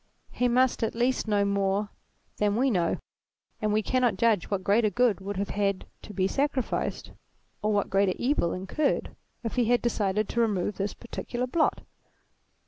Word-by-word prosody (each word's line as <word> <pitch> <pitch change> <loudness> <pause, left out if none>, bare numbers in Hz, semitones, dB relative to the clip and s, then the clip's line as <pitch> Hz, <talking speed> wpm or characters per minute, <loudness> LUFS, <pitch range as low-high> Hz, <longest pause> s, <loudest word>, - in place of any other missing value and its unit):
He 250 - +1
must 255 +1 +2
at 225 - -1
least 245 0 +1
know 205 -1 +2
more 200 +1 0 0.5
than 210 -1 +1
we 260 +3 +2
know, 175 -5 +1 0.6
and 215 -1 +1
we 215 +1 +2
cannot 245 -5 +1
judge 220 -4 +2
what 195 -2 -1
greater 215 +3 +3
good 225 -1 +2
would 200 0 -5
have 200 +1 -2
had 200 -1 0 0.2
to - - -10
be 190 -2 0
sacrificed, 275 +2 -1 0.5
or 215 - +1
what 205 -1 0
greater 195 -1 +3
evil 245 - +1
incurred, 195 +11 -1 0.3
if 230 +2 -4
he 245 - +3
had 240 +2 +3
decided 210 -3 0
to 235 - +1
remove 205 -3 0
this 200 +1 -2
particular 240 +1 -4
blot. 310 +5 +1
210 Hz, 170 wpm, -27 LUFS, 200-240 Hz, 0.6 s, greater